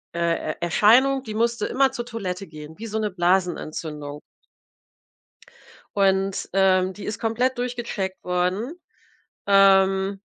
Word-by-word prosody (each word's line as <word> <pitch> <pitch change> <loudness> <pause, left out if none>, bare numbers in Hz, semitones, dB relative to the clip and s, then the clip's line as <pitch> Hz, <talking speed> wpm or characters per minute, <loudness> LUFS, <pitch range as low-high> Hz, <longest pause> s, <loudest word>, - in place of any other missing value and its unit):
äh, 170 -2 -1
Er - - -10
Erscheinung, 255 +10 +4
die 215 - -7
musste 235 +2 0
immer 265 0 +2
zur 240 -3 -5
Toilette 195 -5 -5
gehen, 155 +1 -11
wie 225 +1 -7
so 220 - -3
'ne 215 -1 -1
Blasenentzündung. 165 -5 -2 1.8
Und, 195 0 +1
ähm, 190 -1 +3
die 205 - -10
ist 210 -1 -4
komplett 245 +3 0
durchgecheckt 240 -6 -4
worden, 180 - -1 0.7
ähm 195 0 +4
195 Hz, 120 wpm, -23 LUFS, 180-230 Hz, 1.8 s, Erscheinung